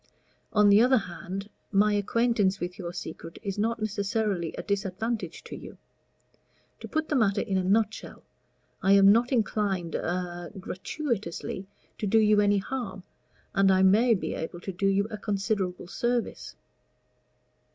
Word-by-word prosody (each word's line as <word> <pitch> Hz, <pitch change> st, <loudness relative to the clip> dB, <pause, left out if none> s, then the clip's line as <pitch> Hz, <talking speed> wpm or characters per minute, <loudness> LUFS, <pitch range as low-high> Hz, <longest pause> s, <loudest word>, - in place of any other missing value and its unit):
On 210 Hz, -2 st, +5 dB
the 200 Hz, +2 st, +7 dB
other 255 Hz, +2 st, +5 dB
hand, 190 Hz, 0 st, -5 dB, 0.2 s
my 210 Hz, +1 st, +4 dB
acquaintance 205 Hz, -1 st, +1 dB
with 175 Hz, +2 st, -5 dB
your 170 Hz, -2 st, -4 dB
secret 165 Hz, -1 st, -8 dB
is 200 Hz, -1 st, -3 dB
not 230 Hz, +2 st, 0 dB
necessarily 205 Hz, -4 st, -1 dB
a -, -, -5 dB
disadvantage 200 Hz, +3 st, -3 dB
to -, -, -8 dB
you. -, -, -10 dB, 1.0 s
To -, -, -8 dB
put 315 Hz, 0 st, -1 dB
the 300 Hz, -, 0 dB
matter 210 Hz, -6 st, +2 dB
in 200 Hz, -4 st, -2 dB
a 190 Hz, -, +1 dB
nutshell, 215 Hz, +3 st, 0 dB, 0.6 s
I 195 Hz, -, +4 dB
am 200 Hz, 0 st, +7 dB
not 235 Hz, +4 st, +3 dB
inclined 200 Hz, -, 0 dB
a 175 Hz, 0 st, -3 dB
gratuitously 190 Hz, -, -4 dB, 0.3 s
to 210 Hz, -, -1 dB
do 225 Hz, -, +3 dB
you 210 Hz, -1 st, +5 dB
any 205 Hz, 0 st, +3 dB
harm, 195 Hz, -3 st, -4 dB, 0.5 s
and 195 Hz, -2 st, +4 dB
I 190 Hz, 0 st, +4 dB
may 220 Hz, +5 st, +5 dB
be 185 Hz, -, -3 dB
able 170 Hz, +2 st, -5 dB
to 195 Hz, -, -4 dB
do 195 Hz, +2 st, 0 dB
you 195 Hz, +1 st, +2 dB
a 215 Hz, -, -5 dB
considerable 195 Hz, -3 st, -2 dB
service." 240 Hz, +5 st, -2 dB
200 Hz, 150 wpm, -27 LUFS, 190-220 Hz, 1.0 s, the